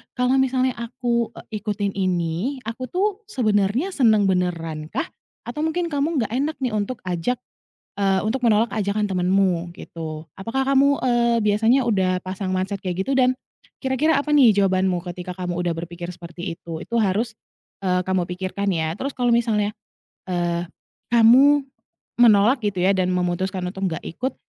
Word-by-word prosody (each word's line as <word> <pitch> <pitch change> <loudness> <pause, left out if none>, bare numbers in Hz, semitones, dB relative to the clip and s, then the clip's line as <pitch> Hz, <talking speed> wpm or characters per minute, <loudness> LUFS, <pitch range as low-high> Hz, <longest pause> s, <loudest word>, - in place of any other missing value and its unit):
"Kalau 250 +1 +2
misalnya 260 0 +2
aku, 235 -1 -2
eee, 215 - -7
ikutin 205 -2 -2
ini, 185 - -1
aku 235 +3 -5
tuh 400 +3 -1
sebenarnya 225 - +1
senang 220 - +4
beneran 170 -5 -1
kah? 325 - -2 0.4
Atau 240 +5 -6
mungkin 340 +1 -2
kamu 290 +3 0
nggak 215 - -8
enak 285 +6 -1
nih, 250 - 0
untuk 215 +3 -3
ajak, 180 +7 -1 0.6
eee, 195 -1 +2
untuk 220 +5 -1
menolak 220 +1 +3
ajakan 210 0 -1
temanmu," 180 -2 +1
gitu. 160 -3 -7 0.2
Apakah 230 +7 -1
kamu, 275 +1 +4
eee, 235 -2 +3
biasanya 225 +5 +3
udah 185 -5 +1
pasang 185 0 -3
mindset 195 +2 -2
kayak, 185 0 -2
gitu? 270 - -3
Dan, 255 0 +4 0.5
kira-kira 265 +5 +2
apa 290 +2 0
nih, 250 -8 +6
jawabanmu 185 -2 +1
ketika 180 0 -7
kamu 180 -1 -3
udah 175 -1 0
berpikir 170 +1 -6
seperti 170 0 -7
itu? 165 -1 -7
Itu 235 +7 -6
harus, 215 +4 0 0.5
eee, 180 -1 +2
kamu 185 -1 +1
pikirkan, 190 +2 -2
ya. 160 -2 -1
Terus, 275 +7 -3
kalau 245 -1 -1
misalnya, 215 -3 +1 0.5
eee, 175 -1 0 0.5
kamu 265 +5 +6 0.5
menolak, 230 +2 +5
gitu 205 -3 -1
ya, 195 +1 +4
dan, 185 -1 +1
memutuskan 180 +1 -1
untuk 190 -1 -1
nggak 160 - -5
ikut, 255 +10 -3
205 Hz, 160 wpm, -22 LUFS, 180-250 Hz, 0.6 s, nih